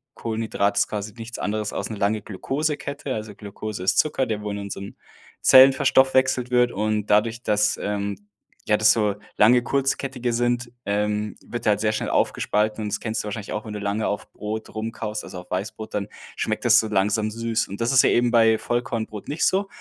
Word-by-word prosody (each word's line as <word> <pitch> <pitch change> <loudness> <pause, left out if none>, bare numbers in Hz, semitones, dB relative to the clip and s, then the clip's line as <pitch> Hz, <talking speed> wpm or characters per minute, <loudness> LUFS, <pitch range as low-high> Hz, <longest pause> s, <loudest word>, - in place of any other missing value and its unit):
Kohlenhydrat 110 -3 -1
ist - - +3
quasi 105 0 -5
nichts 115 +1 -8
anderes 105 0 -2
als - - -3
'ne 110 - -5
lange 105 +2 0
Glukosekette. 140 +5 -3
Also 105 -2 -6
Glukose 105 -1 -7
ist 95 - +2
Zucker, 145 -3 +2
der 110 -3 -3
wo 105 - -4
in 100 - -4
unserem 100 0 -7 0.5
Zellen 130 0 +8
verstoffwechselt 130 -2 +3
wird 125 -1 +3
und 105 0 -1
dadurch, 115 +3 +2
dass, 105 0 +2
ähm, 100 -1 -2 0.5
ja, 105 - +3
das 110 0 +5
so 105 -3 +1 0.2
lange 120 +4 +5
kurzkettige 135 -1 -1
sind, 120 0 0
ähm, 105 +1 -1
wird 120 - -6
der 105 - +5
halt 105 0 0
sehr 110 - +2
schnell 110 - -2
aufgespalten 105 +1 0
und 105 0 -3
das - - -2
kennst 110 -1 -2
du - - -9
wahrscheinlich 105 0 -5
auch, 105 - -4
wenn 110 - -6
du 105 - -4
lange 100 +2 -1
auf 105 - -4
Brot 110 +1 -6
rumkaust, 110 -1 -4
also 90 - -8
auf 90 - -21
Weißbrot, 110 +3 -4
dann 100 -1 -2 0.3
schmeckt - - -2
das - - +7
so 110 - -1
langsam 105 +1 +1
süß. 115 +1 -1
Und 100 +4 -7
das 115 - +1
ist 135 -2 +6
ja - - +5
eben 120 0 +2
bei 115 -1 +5
Vollkornbrot 115 -3 -3
nicht 150 +3 -2
so, 195 +1 +2
110 Hz, 205 wpm, -23 LUFS, 105-120 Hz, 0.5 s, Zellen